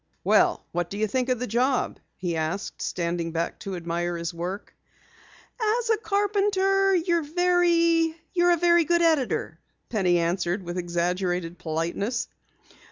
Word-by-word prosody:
"Well, - - +3
what 175 0 -2
do 200 - -6
you 215 - +1
think 250 +4 -1
of 255 - +2
the 250 - -3
job?" 250 +3 0 0.2
he 175 -2 -3
asked, 160 +5 -3
standing 170 -1 -2
back 165 +1 -2
to 195 -1 -5
admire 175 0 -2
his 170 +1 -4
work. 180 +4 -6 0.9
"As 450 +2 +1
a 445 - +3
carpenter 395 -2 +2
you're 340 -1 +2
a - - -5 1.3
very 345 0 +4
good 345 +2 +2
editor," 260 - +1 0.3
Penny 185 -6 +2
answered 175 +2 -1
with 175 +1 -4
exaggerated 175 0 -2
politeness. 170 +8 -2
195 Hz, 135 wpm, -25 LUFS, -, 1.3 s, very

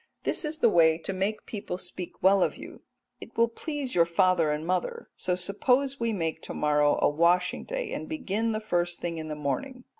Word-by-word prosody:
This - - 0
is 305 0 -3
the 270 - +4
way 160 -4 +5
to 175 +4 -5
make 195 +3 -2
people 200 -4 -5
speak 180 -1 -7
well 195 +1 +5
of - - +1
you, - - -9 0.5
and - - -9
it - - -28
will 230 0 +5
please 280 +2 -5
your 170 -1 +4
father 170 -1 +3
and 150 +1 -2
mother, 180 0 -2
so 180 - -1
suppose 250 +9 +1
we 230 -1 0
make 165 -6 -2
to - - -7
morrow 150 -1 +3
a - - +4
washing 175 +4 +2
day, - - -4
and - - -5
begin 230 -7 -1
the 215 - -1
first 175 -5 -1
thing 170 -1 -3
in 155 - -5
the 155 - -4
morning. 250 - -3
185 Hz, 215 wpm, -28 LUFS, 170-230 Hz, 0.5 s, way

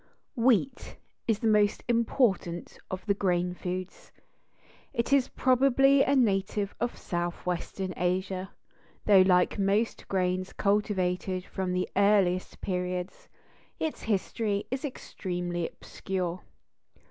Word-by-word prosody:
Wheat 245 0 +1 0.3
is 225 -3 +2
the 225 +1 -1
most 210 -1 +3
important 230 -7 0
of 185 0 -5
the 205 - +3
grain 180 -3 0
foods. 180 +1 -6 0.8
It 235 +4 0
is 275 -3 +4
probably 270 +1 +4
a 275 +1 +3
native 200 -4 +1
of 240 - -2
Southwestern 175 +2 -3
Asia, 185 +1 -1 0.6
though 200 -3 +7
like 185 +2 +3
most 200 +3 0
grains 185 0 -1
cultivated 190 -3 0
from 190 -1 -3
the 180 0 0
earliest 195 -3 +2
periods, 180 -1 -3 0.5
its 315 - -3
history 205 0 -1
is 260 0 -2
extremely 175 - -4
obscure. 185 -2 -4
195 Hz, 110 wpm, -28 LUFS, 180-225 Hz, 0.8 s, though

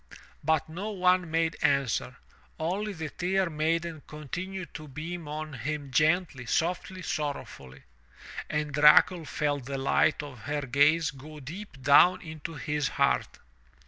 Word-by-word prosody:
But 160 -1 +1
no 180 +7 -5
one 180 -3 +2
made 165 0 0
answer. 135 -2 +1 0.4
Only 190 +7 -1
the 160 -4 -5
Tear 185 0 0
Maiden 160 +1 -1
continued 180 +5 -6
to 155 -1 -8
beam 160 +4 -6
on 155 +1 -5
him 140 +3 -4
gently, 155 -4 +1
softly, 180 +5 -1
sorrowfully. 105 - -5 0.7
And 150 -1 -2
Dracul 150 +3 +6
felt 145 -4 -1
the 135 +1 -4
light 140 +3 +2
of 140 -4 -9
her 145 +7 -3
gaze 145 +5 +3
go 150 +3 -11
deep 160 +3 -9
down 175 +7 +6
into 160 0 -7
his 150 -1 -1
heart. 65 - 0
155 Hz, 135 wpm, -28 LUFS, 145-170 Hz, 0.7 s, Dracul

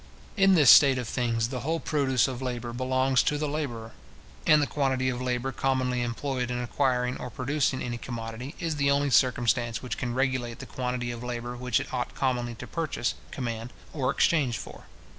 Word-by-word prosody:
In 195 -2 +5
this 145 -7 +8
state 135 -3 +7
of 125 -2 -3
things, 115 -1 0
the 130 -1 -4
whole 160 +6 -1
produce 135 -7 +1
of 130 -1 -5
labour 120 -2 -4
belongs 130 +1 +2
to 150 - 0
the 150 0 -1
labourer; 125 -7 -4 0.6
and 155 - +7
the 145 - +2
quantity 130 -3 0
of 125 0 -3
labour 125 +1 -1
commonly 130 -2 0
employed 125 +1 -2
in 125 - -2
acquiring 125 0 0
or 125 - -6
producing 135 +1 -1
any 120 -1 -4
commodity, 115 +4 -6
is 165 -3 -2
the 140 -1 +2
only 140 0 +2
circumstance 120 0 +2
which 125 - -4
can 120 -1 -3
regulate 130 -3 -1
the - - -8
quantity 125 -1 -3
of 120 0 -7
labour 120 0 -4
which 125 -1 0
it - - -7
ought 125 -1 -3
commonly 120 -3 -1
to - - -8
purchase, 155 -7 -2 0.2
command, 115 -2 -4 0.2
or 135 -4 0
exchange 140 -6 +2
for. - - -10
125 Hz, 190 wpm, -27 LUFS, 120-135 Hz, 0.6 s, this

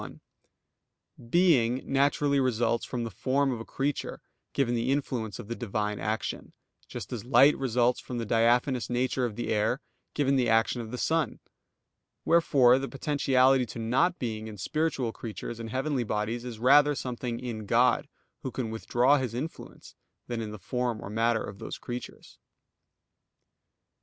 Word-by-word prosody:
1: - - -9 1.1
Being 130 -7 +3
naturally 140 +1 +2
results 120 -2 +1
from 120 -2 -3
the 115 - -4
form 135 +6 0
of 120 - -3
a - - -5
creature, 140 +1 -3 0.3
given 130 -4 +1
the 120 +1 -1
influence 125 -6 -2
of - - -9
the 115 - -3
Divine 105 -3 -3
action; 110 +2 -3 0.3
just - - -7
as 115 - -4
light 130 +4 +6
results 125 -1 +1
from 125 - -6
the 115 - -2
diaphanous 120 +3 +2
nature 125 +1 0
of 115 -4 -4
the 120 - -4
air, 110 +5 +1 0.4
given 140 -2 +2
the 125 -3 +2
action 115 +2 +2
of 110 - -7
the 125 - -5
sun. 160 +4 0 0.9
Wherefore 135 -7 +5
the 135 - -3
potentiality 135 -3 +2
to - - -8
not 130 +11 +1
being 110 -3 -4
in 105 -1 -8
spiritual 135 - -1
creatures 115 +1 -7
and 115 -1 -6
heavenly 130 +1 -1
bodies 110 +2 -2
is 120 -3 -6
rather 145 +5 +5
something 125 -2 -4
in 110 -4 -6
God, 120 +4 +3 0.3
Who 130 - -3
can 120 -3 -4
withdraw 120 +5 +2
His 125 -3 -3
influence, 150 +7 -7 0.3
than 120 -2 -3
in 110 - -4
the 105 - -7
form 120 +3 -2
or 100 - -7
matter 115 +1 +1
of 100 -1 -8
those - - -6
creatures. 125 0 -8
120 Hz, 160 wpm, -28 LUFS, 115-135 Hz, 1.1 s, light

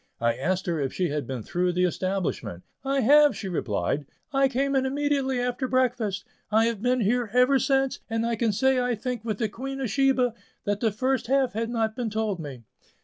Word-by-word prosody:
I 115 0 +2
asked 185 +9 -1
her 170 -3 -1
if 135 -2 -1
she 180 -2 -1
had 145 -4 -3
been 130 -4 -4
through 180 +6 0
the 180 +1 +1
establishment. 180 - -2 0.2
"I 275 0 +1
have," 290 +3 +6
she 200 - -5
replied; 135 - -1 0.3
"I 270 0 +4
came 275 +2 0
in 265 - +3
immediately 275 -1 0
after 250 +2 -1
breakfast; 245 -6 0 0.3
I 220 +1 +4
have 230 -3 -1
been 250 +1 +2
here 230 +2 +1
ever 250 +2 +5
since, 270 -1 +1
and, 225 0 0
I 235 0 0
can 225 0 +1
say 260 +5 +2
I 245 -1 0
think 240 0 -4
with 215 -3 -2
the 220 - 0
Queen 270 +6 -6
of 255 -6 -2
Sheba, 265 -2 +2 0.3
that 205 0 -1
'the 240 +4 0
half 265 -2 +2
had 225 +2 -2
not 225 -2 -1
been 245 -3 -2
told 215 -3 -1
me. 135 -6 -8
230 Hz, 205 wpm, -26 LUFS, 190-260 Hz, 0.3 s, have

